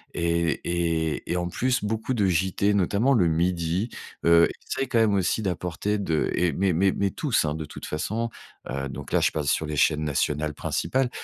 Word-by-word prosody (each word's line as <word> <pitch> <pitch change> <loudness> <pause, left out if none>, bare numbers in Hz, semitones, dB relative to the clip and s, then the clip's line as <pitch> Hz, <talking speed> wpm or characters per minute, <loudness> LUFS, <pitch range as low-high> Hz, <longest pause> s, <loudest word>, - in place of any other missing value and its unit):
et 85 -1 0
et 85 -2 -1
et 90 - +1
en 90 0 -1
plus, 125 +6 0
beaucoup 110 +4 -1
de 105 -4 +2
JT, 95 +3 +1
notamment 100 +7 +2
le 100 -9 +4
midi, 85 +4 0 0.4
heu, 85 0 +6 0.2
essayent 135 - -2
quand 120 - 0
même 110 -2 +3
aussi 95 +3 +1
d'apporter 90 +2 -2
de 80 -6 0
et 90 -1 +2
mais 95 +3 +1
mais 95 +4 +3
mais 100 -1 0
tous, 135 - 0
de 75 +1 -3
toute 75 - -9
façon, 110 +10 -2 0.4
heu, 70 +1 -3
donc - - -8
là, - - +3
je - - +2
passe 75 -2 -3
sur 80 - +1
les 75 - -3
chaînes 75 +1 +2
nationales 75 +1 -1
principales. 125 - -1
90 Hz, 190 wpm, -25 LUFS, 80-105 Hz, 0.4 s, heu